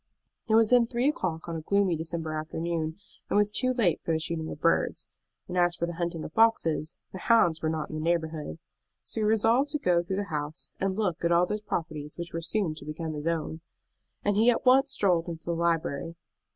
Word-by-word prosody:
It 220 - +4
was 225 0 +4
then 245 -2 +5
three 240 +3 0
o'clock 175 - -2
on 170 - -4
a 160 - -4
gloomy 200 +1 +2
December 160 0 -4
afternoon, 160 +1 -3 0.3
and - - +2
was 210 0 +3
too 255 +3 +2
late 215 -10 +1
for - - -1
the 160 - +1
shooting 160 0 -3
of - - -7
birds; 165 - +1 0.4
and 180 - -5
as 175 -1 +3
for 170 - -1
the 170 - -5
hunting 170 -1 -3
of 155 - -8
foxes, 165 -9 +2 0.2
the 190 - -7
hounds 175 -8 +3
were 155 - 0
not 155 -1 -3
in - - -8
the 155 - -3
neighborhood. 160 - -1 0.5
So 220 - -2
he - - +1
resolved 225 +6 +3
to - - +1
go 180 -10 +2
through 190 +2 -3
the 200 -3 -4
house, 145 -2 -4
and 190 0 -1
look 185 -7 -1
at 170 - +2
all 170 +1 +5
those 210 +3 -3
properties 155 -6 -4
which 170 0 -6
were 165 - -3
so 165 - -1
soon 195 -8 0
to - - -10
become 155 +1 -4
his 150 +1 -4
own. 160 -1 -2 0.6
And 205 0 +2
he 225 +4 +5
at 245 - +1
once 265 +2 +5
strolled 175 -4 +2
into 165 -1 -7
the 170 - -1
library. 165 -2 -1
170 Hz, 230 wpm, -28 LUFS, 160-205 Hz, 0.6 s, then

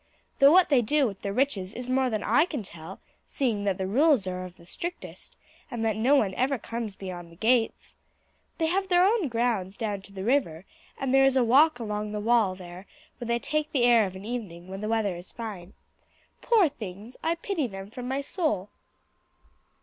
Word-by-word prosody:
Though 275 +1 +8
what 365 +2 +6
they 270 -5 +5
do 285 +5 +2
with 200 -5 -4
their 200 - -3
riches 210 -5 -1
is 245 0 -5
more 260 0 +2
than 215 -3 -2
I 270 +9 +4
can 290 -10 -5
tell, 170 0 -9 0.3
seeing 225 -8 -1
that 195 -2 0
the 190 - -2
rules 265 +2 +3
are 185 0 -4
of 180 -1 -12
the 170 - -17
strictest, 345 - -7 0.3
and 235 -4 -3
that 220 -2 +1
no 245 +6 +3
one 205 -9 +2
ever 260 +6 0
comes 230 -3 -5
beyond 175 -3 -8
the - - -15
gates. 225 +4 0 0.6
They 325 - +1
have 385 +4 0
their 360 0 +4
own 410 -4 +2
grounds 230 -6 -1
down 205 -3 -3
to 195 - -14
the 190 -1 -6
river, 195 - 0 0.3
and 265 -1 -1
there 270 0 +6
is 270 0 +3
a 255 - +4
walk 275 +6 +5
along 210 -2 -4
the 210 - -2
wall 220 -3 +2
there 180 +1 -11 0.3
where 240 - -6
they 235 0 +1
take 305 +5 -2
the 260 -4 +2
air 235 -4 +5
of 185 - -9
an 190 +2 -9
evening 190 -7 -6
when 195 +1 -6
the 215 - -3
weather 220 -5 0
is 175 +1 -10
fine. 205 -6 -7 0.7
Poor 440 -7 +4
things, 215 -3 -9
I 330 +1 0
pity 335 -4 -2
them 195 -1 -9
from 245 +1 -7
my 265 +2 -1
soul." 280 - -1
230 Hz, 210 wpm, -27 LUFS, 195-270 Hz, 0.7 s, Though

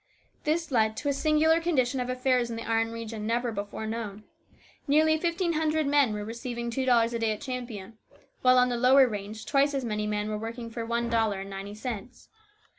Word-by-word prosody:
This 320 0 0
led 220 -3 +2
to 285 - -1
a - - +2
singular 315 +3 +3
condition 265 -6 +1
of 250 0 -2
affairs 255 -1 +1
in 230 - -4
the 230 - -6
iron 225 0 +1
region, 225 -2 -5
never 240 +1 0
before 205 +1 -5
known. 220 -2 -5 0.6
Nearly 310 +2 +4
fifteen 340 +1 0
hundred 315 0 +1
men 280 -4 +3
were 210 0 -4
receiving 235 +1 -5
two 260 +3 -1
dollars 235 -1 +4
a 235 - -1
day 225 -1 +1
at 210 - -9
Champion, 235 -5 -6 0.4
while 255 0 +5
on 250 0 +5
the 240 - -1
lower 260 +2 +6
range 210 0 -6
twice 280 0 +2
as 270 -2 -1
many 210 -2 -2
men 210 0 -1
were 215 0 -3
working 230 +1 -6
for 230 0 -4
one 235 0 0
dollar 225 -4 +1
and 195 0 -8
ninety 195 +1 -6
cents. 235 +1 -7
235 Hz, 205 wpm, -28 LUFS, 220-270 Hz, 0.6 s, lower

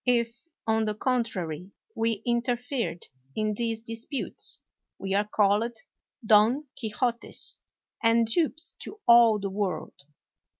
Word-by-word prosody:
If, 240 +3 +1 0.2
on 220 0 +2
the 215 -1 -1
contrary, 195 - -1 0.2
we 225 -2 0
interfered 240 - -1 0.3
in 215 0 0
these 225 0 -2
disputes, 230 +4 -4 0.4
we 195 0 -3
are 205 +1 +2
called 210 +3 +2 0.5
Don 220 +7 +5
Quixotes, 235 +1 -2 0.4
and 230 0 +4
dupes 315 +7 0
to 425 - -8
all 235 -2 +8
the 195 -1 -3
world. 195 -1 -2
225 Hz, 115 wpm, -28 LUFS, 210-240 Hz, 0.5 s, all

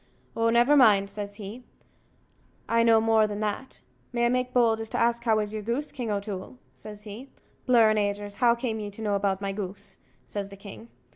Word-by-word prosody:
"Oh, 230 0 +2
never 240 +5 +4
mind," 205 -7 +5
says 205 -1 -6
he, 215 +4 -9 1.0
"I 230 0 +3
know 230 -1 +5
more 220 -1 +3
than 205 0 -5
that. 215 +5 -4 0.3
May 240 -1 +1
I - - +3
make 250 0 0
bold 225 -3 +2
to 225 - -4
ask 235 0 +1
how 220 -2 +3
is 210 0 -2
your 215 - -3
goose, 240 +8 -2
King 245 -5 -5
O'Toole?" 200 +2 -4 0.2
says 210 -1 -10
he. 220 +6 -9 0.4
"Blur 230 -3 +5
an 215 - +1
agers, 205 0 -2
how 235 -2 +4
came 235 -2 -3
ye 205 -1 -5
to 205 +2 -9
know 205 -1 0
about 200 -1 0
my 195 0 -2
goose?" 195 -1 -6 0.3
says 200 -1 -5
the 200 - -12
king. 200 +3 -11
220 Hz, 205 wpm, -26 LUFS, 205-235 Hz, 1.0 s, mind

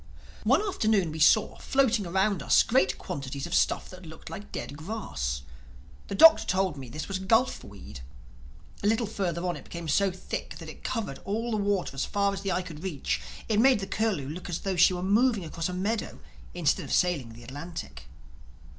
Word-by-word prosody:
One 270 - +4
afternoon 215 - +1
we 160 - -6
saw, 205 +7 +4
floating 240 -7 +2
around 190 0 +1
us, - - +5
great 235 -5 +2
quantities 135 0 -5
of 175 - -6
stuff - - +2
that 185 0 -11
looked 160 -1 -11
like 205 - -8
dead 125 +4 -5
grass. 75 - -4 0.6
The - - -4
Doctor 325 +10 +8
told 185 -4 +1
me 135 -3 -8
this 155 +6 -5
was 195 -1 -3
gulf 225 +7 +2
weed. 70 -10 -11 0.8
A 205 - 0
little 225 +2 +2
further 180 -5 -2
on 175 - -1
it - - -9
became 170 -1 -7
so 195 +5 +3
thick 185 0 -6
that - - -9
it - - -12
covered 215 - -3
all 225 +4 -2
the 215 - +1
water 200 -5 0
as 135 - -2
far 200 -1 +1
as 195 - -5
the 195 -1 -2
eye 180 +1 0
could 160 -4 -9
reach; 170 -7 -2 0.3
it 215 -2 +2
made 255 -1 +5
the 195 - -3
Curlew 195 -9 -1
look 175 +4 -7
as 170 - -3
though 195 -1 -1
she 180 +1 +5
were 180 - -4
moving 210 0 +2
across 165 +2 -3
a - - -3
meadow 200 +5 -2 0.4
instead 165 -5 +1
of - - -8
sailing 155 -11 +1
the 120 +1 -13
Atlantic. 140 - -8
185 Hz, 200 wpm, -28 LUFS, 155-210 Hz, 0.8 s, Doctor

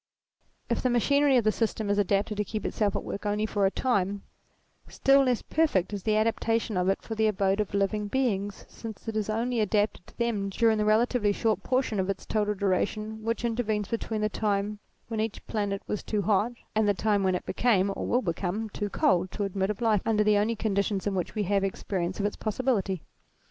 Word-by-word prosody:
If - - 0
the 255 - +1
machinery 280 +3 +3
of 240 - +3
the 215 - +3
system 220 -1 -1
is 205 0 +1
adapted 200 +1 +1
to 210 - +1
keep 215 +2 -5
itself 205 -2 0
at - - -2
work 200 - -5
only 210 +1 0
for 205 -2 +1
a - - +2
time, 200 -4 0 0.6
still 275 +1 +4
less 250 -3 +1
perfect 210 - +1
is 200 - -3
the 215 +2 +1
adaptation 225 0 0
of 180 +1 +1
it 195 - 0
for 225 - -5
the 220 0 +2
abode 195 -1 +1
of 205 -1 -1
living 205 +1 0
beings 205 -5 -1
since 225 -1 -9
it 225 - -3
is 215 -1 -1
only 235 +2 0
adapted 210 -2 0
to - - -18
them 225 -4 0
during 220 +2 +2
the 210 - +1
relatively 215 0 +3
short 220 +1 0
portion 255 -5 0
of 190 +1 0
its 195 - -3
total 210 -1 0
duration 210 +3 -1
which 230 +1 -1
in 230 -1 0
tervenes 215 -4 -1
between 225 -1 -2
the 215 - +2
time 210 -1 -1 0.3
when 225 -1 -3
each 220 -1 -3
planet 205 -2 -2
was 210 - -3
too 210 -2 -2
hot 210 +4 +2 0.2
and 215 -1 +2
the 205 - +3
time 205 0 +1
when 190 -1 +2
it - - -4
became 200 -5 +2
or - - -4
will 250 +2 +2
become 195 +4 -2
too 205 0 -3
cold 185 -1 +2
to 205 - -3
admit 195 0 -1
of 210 +2 -3
life 220 -4 +3
under 215 -2 +2
the 210 0 +4
only 215 +3 +1
conditions 200 -2 -1
in 205 - 0
which 185 +2 -3
we 210 - 0
have 195 +1 +1
experience 185 -1 -2
of 200 - 0
its 205 - -1
possibility. 210 - -1
210 Hz, 220 wpm, -28 LUFS, 200-225 Hz, 0.6 s, still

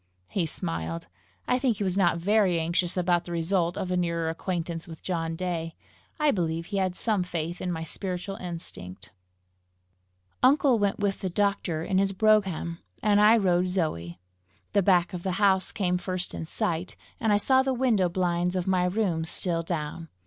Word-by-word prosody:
He 180 -5 0
smiled. 85 - -4 0.4
I 250 - +2
think 250 -5 +1
he 205 - -2
was 185 -2 0
not 175 -4 +3
very 190 -1 +2
anxious 170 +2 0
about 175 -1 +2
the 175 - -7
result 170 +1 0
of 185 - -3
a - - +1
nearer 170 -2 0
acquaintance 170 -1 -4
with 160 -2 -11
John 165 -3 -2
Day. 165 -2 -3 0.4
I 300 -1 +4
believe 165 -4 -1
he 200 +2 -4
had 185 -2 0
some 215 -2 0
faith 175 -1 -4
in 180 - -2
my 165 -1 -3
spiritual 185 +3 -4
instinct. 100 - -7 1.3
Uncle 260 -2 +4
went 200 -1 +1
with 200 -1 -1
the 190 - -2
doctor 185 -4 0
in 190 +2 +1
his 195 0 +1
brougham, 190 -5 +2 0.2
and 210 -1 +4
I 215 +2 +7
rode 180 -3 +2
Zoe. 90 - -2 0.5
The 200 - +4
back 180 -1 +3
of 180 - -4
the 185 0 -2
house 190 -1 +2
came 180 -3 0
first 180 0 -3
in - - -5
sight, 170 +2 -2 0.2
and 220 -2 +1
I 205 - +5
saw 260 +6 +4
the 265 0 0
window 235 -8 +2
blinds 180 0 0
of 180 -1 -1
my 185 -1 +2
room 180 -4 0
still 165 +1 +1
down. 165 -1 -4
180 Hz, 180 wpm, -27 LUFS, 170-200 Hz, 1.3 s, I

